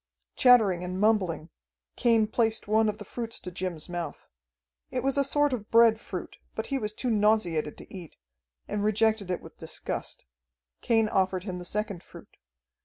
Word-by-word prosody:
Chattering 220 Hz, -9 st, +5 dB
and 180 Hz, +1 st, -4 dB
mumbling, 190 Hz, -7 st, +1 dB, 0.4 s
Cain 230 Hz, -2 st, +4 dB
placed 220 Hz, 0 st, 0 dB
one 220 Hz, +1 st, +3 dB
of 210 Hz, -, -3 dB
the 205 Hz, -, -9 dB
fruits 230 Hz, +2 st, -5 dB
to 180 Hz, -, -6 dB
Jim's 175 Hz, -3 st, -4 dB
mouth. 175 Hz, -1 st, -6 dB, 0.6 s
It 250 Hz, -1 st, -2 dB
was 270 Hz, 0 st, +1 dB
a 280 Hz, -, +3 dB
sort 290 Hz, 0 st, +2 dB
of 215 Hz, -4 st, -4 dB
bread 230 Hz, -1 st, +6 dB
fruit, -, -, -7 dB, 0.2 s
but -, -, -3 dB
he 270 Hz, -, +1 dB
was 210 Hz, -3 st, -2 dB
too 245 Hz, +3 st, -2 dB
nauseated 205 Hz, -8 st, +1 dB
to -, -, -13 dB
eat, 175 Hz, -4 st, -10 dB, 0.5 s
and 205 Hz, 0 st, -2 dB
rejected 215 Hz, -1 st, +2 dB
it 180 Hz, -, -2 dB
with -, -, -14 dB
disgust. -, -, -5 dB, 0.6 s
Cain 225 Hz, -2 st, +3 dB
offered 185 Hz, -2 st, +1 dB
him 185 Hz, -3 st, -5 dB
the 180 Hz, -, -7 dB
second 205 Hz, -2 st, -2 dB
fruit. -, -, -15 dB
210 Hz, 175 wpm, -28 LUFS, 185-225 Hz, 0.6 s, bread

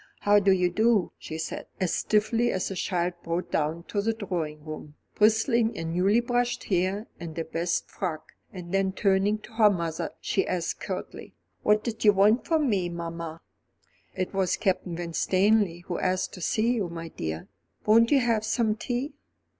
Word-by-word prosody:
"How 205 Hz, 0 st, +5 dB
do 200 Hz, -1 st, +3 dB
you 180 Hz, -1 st, +3 dB
do?" 220 Hz, 0 st, +2 dB
she 160 Hz, -, -6 dB
said, 160 Hz, -, -5 dB
as 185 Hz, -2 st, 0 dB
stiffly 225 Hz, +3 st, +2 dB
as 185 Hz, +1 st, -2 dB
a -, -, -4 dB
child 180 Hz, -1 st, -1 dB
brought 170 Hz, +2 st, -3 dB
down 160 Hz, +2 st, -1 dB
to 205 Hz, -, 0 dB
the 225 Hz, +2 st, 0 dB
drawing 165 Hz, -8 st, -4 dB
room, 155 Hz, -1 st, -8 dB, 0.2 s
bristling 225 Hz, +2 st, +3 dB
in 165 Hz, 0 st, -4 dB
newly 195 Hz, +6 st, +3 dB
brushed 245 Hz, 0 st, 0 dB
hair 190 Hz, +3 st, 0 dB
and 165 Hz, -1 st, -7 dB
a 165 Hz, -, -2 dB
best 170 Hz, +2 st, -1 dB
frock, 165 Hz, -5 st, -5 dB, 0.2 s
and 175 Hz, -2 st, -8 dB
then 195 Hz, -1 st, +1 dB
turning 195 Hz, +1 st, +2 dB
to 215 Hz, -, -14 dB
her 220 Hz, -2 st, +5 dB
mother, 170 Hz, -4 st, -2 dB
she 195 Hz, -, 0 dB
asked 175 Hz, -2 st, -2 dB
curtly: -, -, -6 dB, 0.3 s
"What 210 Hz, 0 st, +3 dB
did 225 Hz, -2 st, -4 dB
you 210 Hz, -2 st, +7 dB
want 210 Hz, +5 st, +3 dB
with 320 Hz, -2 st, +3 dB
me, 195 Hz, -9 st, +1 dB
mamma?" 170 Hz, -1 st, -6 dB, 0.7 s
"It 185 Hz, -, -3 dB
was 190 Hz, -2 st, +1 dB
Captain 185 Hz, -2 st, -1 dB
Winstanley 185 Hz, +2 st, +1 dB
who 175 Hz, 0 st, -4 dB
asked 185 Hz, 0 st, 0 dB
to 180 Hz, -, -9 dB
see 225 Hz, +7 st, +1 dB
you, 205 Hz, -7 st, -1 dB
my 165 Hz, 0 st, -6 dB
dear. 80 Hz, -, -5 dB, 0.4 s
Won't 230 Hz, +2 st, +5 dB
you 280 Hz, -2 st, +4 dB
have 230 Hz, -3 st, +1 dB
some 220 Hz, -1 st, +1 dB
tea?" 245 Hz, +5 st, -3 dB
190 Hz, 180 wpm, -27 LUFS, 170-220 Hz, 0.7 s, you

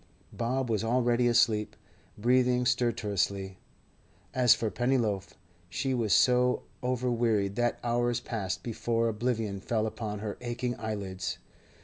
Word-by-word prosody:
Bob 125 Hz, +2 st, -1 dB
was 110 Hz, -2 st, 0 dB
already 120 Hz, +1 st, +2 dB
asleep, 115 Hz, -3 st, +2 dB, 0.4 s
breathing 125 Hz, +2 st, +3 dB
stertorously. 105 Hz, -6 st, 0 dB, 0.7 s
As 125 Hz, -2 st, +5 dB
for 110 Hz, -2 st, -2 dB
Pennyloaf, 120 Hz, -6 st, 0 dB, 0.3 s
she 130 Hz, +9 st, -1 dB
was 115 Hz, -5 st, 0 dB
so 125 Hz, 0 st, +4 dB, 0.2 s
overwearied 120 Hz, -5 st, +1 dB
that 120 Hz, 0 st, +1 dB
hours 120 Hz, 0 st, +1 dB
passed 100 Hz, -7 st, -4 dB
before 115 Hz, 0 st, 0 dB
oblivion 110 Hz, -3 st, -2 dB
fell 110 Hz, +2 st, -1 dB
upon 110 Hz, -1 st, -4 dB
her 105 Hz, 0 st, -5 dB
aching 120 Hz, 0 st, -2 dB
eyelids. 95 Hz, -4 st, -4 dB
115 Hz, 115 wpm, -29 LUFS, 105-125 Hz, 0.7 s, As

